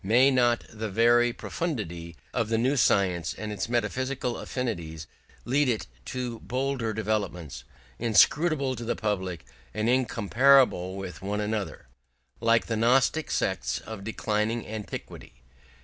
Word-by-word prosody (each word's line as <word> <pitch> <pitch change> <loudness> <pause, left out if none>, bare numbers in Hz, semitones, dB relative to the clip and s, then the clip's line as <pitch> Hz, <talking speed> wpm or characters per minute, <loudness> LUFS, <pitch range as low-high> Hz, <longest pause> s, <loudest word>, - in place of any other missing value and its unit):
May 125 +7 +5
not 120 -2 +3
the 110 0 -5
very 120 +3 +4
profundity 85 - -4 0.2
of 115 -3 0
the 115 - +2
new 130 +5 +2
science 90 - +2
and 110 -1 -5
its 105 +2 -3
metaphysical 125 +2 -1
affinities 85 - -4 0.4
lead 140 +2 +2
it 115 -3 -1 0.2
to 125 -3 -4
bolder 130 -3 -2
developments, 95 - -3 0.3
inscrutable 135 +4 +3
to 120 - -5
the 115 - -1
public 95 -6 -3 0.3
and 110 - 0
incompatible 120 -4 +3
with 95 -4 -7
one 100 +2 -2
another, 105 -1 -3 0.5
like 115 0 +3
the 115 - -2
gnostic 130 +7 +3
sects - - -1
of 110 -3 -8
declining 110 +1 -1
antiquity? 105 - -7
115 Hz, 130 wpm, -27 LUFS, 100-125 Hz, 0.5 s, May